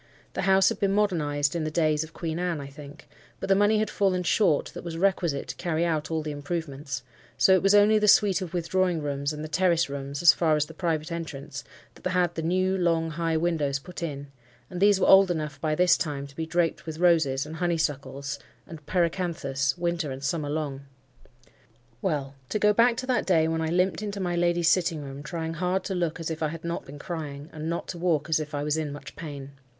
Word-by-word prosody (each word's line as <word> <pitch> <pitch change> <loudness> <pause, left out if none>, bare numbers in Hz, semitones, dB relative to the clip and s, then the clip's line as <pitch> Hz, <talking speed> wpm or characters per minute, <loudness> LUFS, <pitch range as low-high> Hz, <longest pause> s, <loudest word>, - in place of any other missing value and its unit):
The - - -2
house 190 0 +6
had - - -4
been 195 -1 +1
modernized 155 -8 +1
in 165 - -1
the 155 - -1
days 155 -1 +1
of 160 - -11
Queen 165 0 -4
Anne, 175 -3 -1
I 140 - -6
think; 140 +1 -12 0.3
but - - -5
the 195 - +6
money 205 +2 +4
had 215 0 0
fallen 185 -3 +1
short 170 -3 +2
that - - -8
was 170 -1 -5
requisite 175 -6 0
to - - -4
carry 170 -1 0
out 155 -3 -1
all 160 -1 -1
the 150 - -4
improvements, 145 -2 -4 0.3
so 190 - +5
it 185 - +4
was 195 +1 +4
only 210 +1 +6
the 210 - +2
suite 200 -2 +5
of 180 -3 -5
withdrawing 175 -1 0
rooms 140 0 -2
and 150 0 -6
the - - -4
terrace 170 0 +2
rooms, 140 +2 -5
as 170 - +9
far 160 -3 +2
as 150 0 +1
the 160 - -12
private 160 -1 -2
entrance, 150 -4 -6 0.3
that - - -4
had 180 -1 +1
the 165 - -3
new, 185 +3 +1
long, 165 -3 +1
high 165 0 0
windows 155 -4 0
put 175 +6 -10
in, 145 -4 -5 0.4
and 180 0 -5
these 200 -1 +5
were - - +3
old 195 0 +7
enough 150 -4 -3
by 155 -1 0
this 180 0 +5
time 145 -3 -3
to 140 0 -14
be 160 +1 -4
draped 170 0 0
with 155 -1 -5
roses, 160 -6 +3
and 155 +2 -8
honeysuckles, 140 -5 -2 0.3
and 160 -3 -11
pyracanthus, 165 -6 0
winter 170 -3 -1
and 135 +1 -6
summer 145 +1 -1
long. 145 -3 -3 1.2
Well, 145 -7 -1 0.2
to - - 0
go 210 0 +4
back 235 +2 +4
to 255 - -3
that 255 -1 0
day 165 -4 +4
when 160 0 -1
I 160 - 0
limped 180 +4 +1
into 205 -1 -4
my 175 -2 -1
lady's 175 -1 +2
sitting 165 -4 +2
room, 135 0 -8
trying 160 +2 -4
hard 180 +3 -1
to 195 - -3
look 170 -3 -1
as 165 0 -3
if 160 - -5
I 155 - +2
had 160 +1 -7
not 170 0 -3
been 140 +2 -10
crying, 150 -1 -6
and 155 0 -4
not 170 - -3
to 175 - -5
walk 165 -2 0
as 160 - +3
if 150 0 -5
I 145 - -2
was 150 +1 0
in 155 -2 -2
much 140 -1 -9
pain. 140 -4 -7
165 Hz, 230 wpm, -26 LUFS, 150-180 Hz, 1.2 s, as